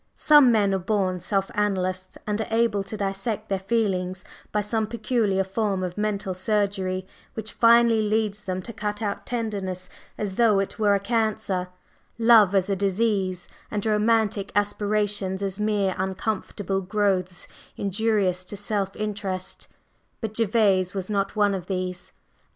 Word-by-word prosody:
Some 295 -5 +6
men 205 -3 +3
are 190 - +1
born 185 -1 0
self 195 +2 -1
analysts, 185 -2 -1
and 210 +1 -1
are - - -3
able 225 -3 +1
to 215 +2 -6
dissect 195 +2 -3
their 195 -1 0
feelings 190 -3 -1 0.3
by 210 - +1
some 215 +1 -1
peculiar 215 -3 0
form 195 -1 -1
of 180 -1 -4
mental 210 -2 -1
surgery 190 -1 -1 0.3
which 220 0 -5
finally 230 -1 +5
leads 210 -1 0
them 185 -1 -3
to 230 - -8
cut 210 0 -3
out 205 -1 -3
tenderness 195 -6 -3 0.3
as 200 -3 -4
though 225 -4 +4
it 195 +2 -2
were 205 -2 +4
a - - +1
cancer, 200 -4 -1 0.5
love 225 -4 +6
as 190 -1 +3
a 200 - 0
disease, 195 -2 0 0.2
and 210 0 -3
romantic 215 -2 +1
aspirations 205 -1 0
as 195 0 -3
mere 205 -3 +1
uncomfortable 195 0 -2
growths 190 -2 -1 0.3
injurious 200 -2 0
to 205 - -6
self 200 -1 -2
interest, 200 -3 -4 0.5
but 220 -2 -4
Gervase 200 -4 +2
was 190 +1 -3
not 200 0 -1
one 205 -1 +3
of 185 -2 -4
these. 185 -1 -4
200 Hz, 150 wpm, -25 LUFS, 190-215 Hz, 0.5 s, Some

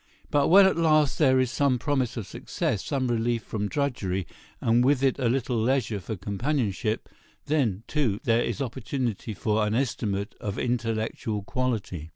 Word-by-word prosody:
But 145 -1 +3
when 195 +3 +8
at 190 - +3
last 155 -4 +3
there 130 0 +5
is 130 -1 +1
some 135 -2 +2
promise 130 -2 -1
of 110 - -3
success, 100 - -3
some 135 -3 -1
relief 120 -1 0
from 105 -2 -3
drudgery, 110 - -1 0.3
and 115 +2 +3
with 135 0 +3
it 135 0 +2
a 125 -3 +2
little 125 -2 0
leisure 115 -4 +1
for 110 +4 -5
companionship—then, 110 - -2
too, 125 -10 0
there 115 0 +3
is 120 +4 -1
opportunity 120 -3 -3
for 105 +2 +1
an 105 +1 0
estimate 105 -6 -1
of 100 0 -4
intellectual 115 -2 -2
quality. 105 -10 -3
120 Hz, 160 wpm, -26 LUFS, 105-135 Hz, 0.3 s, when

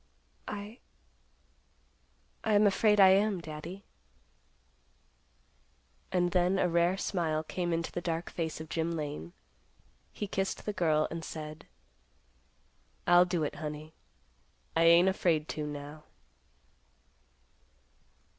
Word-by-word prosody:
"I—I 210 0 -10
am 205 +1 +5
afraid 210 +1 +3
I 190 -1 +9
am, 195 0 +3
Daddy." 170 +4 -8 2.3
And 175 -1 +1
then, 180 +1 +2
a 185 - +2
rare 170 +2 +2
smile 160 -5 -1
came 175 +2 -3
into 165 0 -1
the 175 - -4
dark 165 -1 -3
face 160 -2 -3
of 160 - -7
Jim 165 +2 -2
Lane. 145 - -5 0.8
He 210 - -4
kissed 195 -1 -3
the 210 - -2
girl 155 -5 +2
and 165 0 -5
said, 155 -1 -8 1.4
"I'll 175 0 +6
do 180 -3 -1
it, 145 - -3
honey. 155 0 -6 0.8
I 165 0 +4
ain't 170 +2 +7
afraid 165 -5 +1
to, 150 -1 -3
now." 145 +1 -8
170 Hz, 110 wpm, -30 LUFS, 155-190 Hz, 2.3 s, I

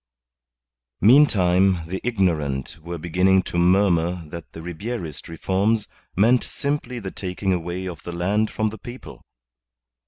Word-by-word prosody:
Meantime, 95 - +5
the 95 +3 -5
ignorant 80 - 0
were 85 +2 -6
beginning 90 +3 +2
to 85 - -2
murmur 90 -2 +2
that 85 0 -9
the - - -10
Ribierist 85 - -6
reforms 100 +6 0 0.3
meant 115 +6 +4
simply 140 -3 -3
the 100 -5 -5
taking 95 0 -2
away 90 +1 -3
of 85 -4 -6
the 85 - -7
land 100 +6 0
from 110 0 -1
the 110 0 -9
people. 100 - -10
95 Hz, 130 wpm, -23 LUFS, 85-105 Hz, 0.3 s, Meantime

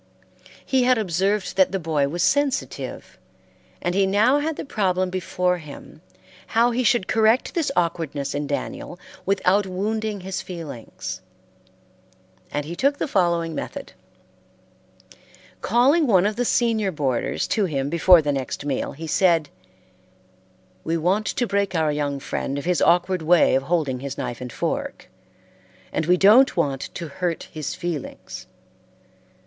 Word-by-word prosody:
He 265 -1 +2
had 250 0 +4
observed 195 0 -1
that 190 -2 +4
the 195 - 0
boy 155 -5 0
was 170 +5 -2
sensitive, 280 +4 -1 0.6
and 175 - 0
he 195 +1 +2
now 220 +9 +3
had 315 +1 -2
the - - -6
problem 185 -6 0
before 180 -1 -1
him 150 0 -12 0.6
how 235 +1 +5
he 250 +2 0
should 235 -4 +2
correct 220 +3 +2
this 320 -5 0
awkwardness 160 -5 -1
in 145 0 -3
Daniel 145 +4 -4 0.3
without 195 0 +2
wounding 210 +2 -2
his 190 +1 -4
feelings; 160 -10 -7 1.3
and 145 0 -2
he 170 +3 -6
took 280 +7 +1
the - - -2
following 170 - +1
method: - - -6 1.7
Calling 280 +6 +3
one 190 -5 +4
of 210 +1 0
the 245 - -1
senior 225 -5 +1
boarders 135 -7 -1
to 210 -3 +1
him 140 -6 -2
before 170 +2 +5
the 145 - 0
next 135 +1 -4
meal, 140 -3 -2
he 160 +4 -8
said: 165 -1 +2 1.3
"We 165 +1 -1
want 190 +6 0
to 245 - 0
break 200 -2 -1
our 160 -2 +2
young 145 -1 -2
friend 135 +1 -3
of 140 - -5
his 180 -1 +1
awkward 180 +1 +3
way 170 +1 +4
of 135 - +3
holding 140 -4 -1
his 140 0 -6
knife 120 - -5
and 125 -1 -6
fork, - - -4 0.8
and 155 - -1
we 180 +1 +4
don't 215 +7 +6
want 140 -5 -1
to 170 - -5
hurt 170 +3 -3
his 155 -3 -5
feelings. 170 -6 -6
180 Hz, 150 wpm, -23 LUFS, 155-210 Hz, 1.7 s, don't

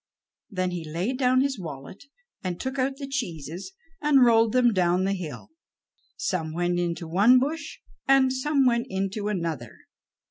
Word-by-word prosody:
Then 185 -4 -2
he 175 -2 -4
laid 175 - -3
down 255 0 +3
his 270 -4 -1
wallet 155 - -9 0.4
and 180 -2 -3
took 265 +1 -4
out 265 +1 0
the 275 - -5
cheeses, 175 - -5 0.3
and 285 -4 +5
rolled 225 -1 +4
them 245 -1 +4
down 180 -1 +2
the 195 +1 +1
hill. 180 - -7 0.7
Some 160 -4 -2
went 175 0 0
into 170 -1 -2
one 200 +10 +5
bush, 300 - -2 0.3
and 265 -1 +5
some 275 +1 +1
went 235 0 +2
into 195 +1 -2
another. 165 - -3
205 Hz, 155 wpm, -26 LUFS, 175-260 Hz, 0.7 s, and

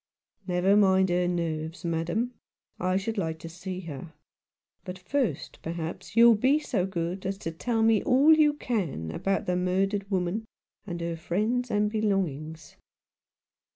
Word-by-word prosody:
" - - -57
Never 180 +2 +3
mind 190 -2 +4
her 175 0 +1
nerves, 165 -1 -3
madam; 170 +9 -1 0.5
I 185 +1 +1
should 215 +2 -2
like 160 -3 -2
to 165 - -9
see 180 +2 -6
her. 160 -1 -8 0.7
But, 185 -2 -7
first, 185 - -2
perhaps 165 +4 -6
you'll 235 0 +8
be 260 +7 +3
so 210 -11 -1
good 180 0 -3
as 195 +1 -2
to 165 -4 -5
tell 225 +7 -1
me 225 -2 +4
all 280 +4 +5
you 300 -1 +4
can 180 - -3
about 195 - -1
the 180 - 0
murdered 195 +2 0
woman 190 +3 -1 0.4
and 170 -2 -4
her 170 0 -2
friends 215 +9 -1
and 210 0 +1
belongings." 175 -8 -2
185 Hz, 155 wpm, -27 LUFS, 170-215 Hz, 0.7 s, you'll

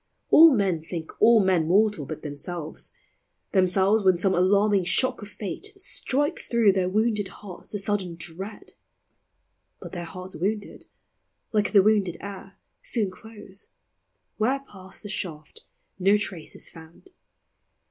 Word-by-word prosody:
All 325 +1 +9
men 190 -6 +1
think 160 0 -6
all 225 -3 +6
men 180 -4 +2
mortal 200 -5 +2
but 155 0 -7
themselves; 155 +2 -6 0.6
Themselves, 190 +2 +3
when 185 -2 +4
some 190 +2 +1
alarming 200 +2 +3
shock 205 +9 +1
of 205 - -8
fate 210 - -5
Strikes 290 -6 -2
through 230 -4 +4
their 185 -1 0
wounded 215 0 +1
hearts 190 -3 -12
the 205 - -2
sudden 195 -3 -1
dread; 185 +5 -8 1.1
But - - -9
their 175 -2 -5
hearts 185 +2 -8
wounded, 205 +5 -3 0.7
like 210 -2 +1
the 200 -3 +6
wounded 205 -4 +2
air, 200 -1 -9 0.2
Soon 210 -6 -1
close; 205 0 -12 0.6
where 260 +5 +1
passed 190 -7 -12
the 205 - -7
shaft, 160 -7 -6 0.3
no 195 +3 +4
trace 190 -6 -5
is - - -6
found. 165 - -15
195 Hz, 135 wpm, -25 LUFS, 180-210 Hz, 1.1 s, All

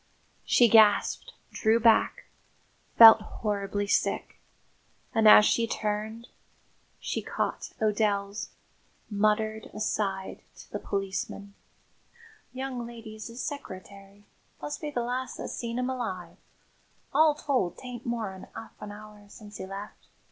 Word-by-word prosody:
She 240 - +5
gasped, 215 -2 +4 0.2
drew 220 +1 +2
back, 230 -1 +3 0.7
felt 225 -1 +10
horribly 205 -1 -3
sick; 200 - -1 0.7
and, 220 -1 +4
as 210 0 +9
she 230 +1 +2
turned, 220 +2 -3 0.7
she - - -3
caught - - -3
O'Dell's 205 -1 0 0.6
muttered 215 +1 0
aside 195 -3 -2 0.2
to - - -14
the - - -4
policeman. 195 0 -4 1.0
"Young 255 -2 -5
lady's 225 -2 -9
'is 235 +2 -7
seccereterry 200 -6 -9 0.4
must 145 0 -6
be 300 - -3
the 245 -5 -2
last 250 +2 -3
that - - -5
seen 235 0 -4
'im 250 +1 -1
alive. 190 -9 -5 0.8
All 305 +1 +5
told, 260 - -1
'tain't 250 -2 -8
more'n 220 -6 -4
'arf 225 0 -8
an 210 - -7
'our 210 0 -13
since 210 -1 -12
'e 190 - -6
left. 195 +2 -9
215 Hz, 120 wpm, -28 LUFS, 205-235 Hz, 1.0 s, felt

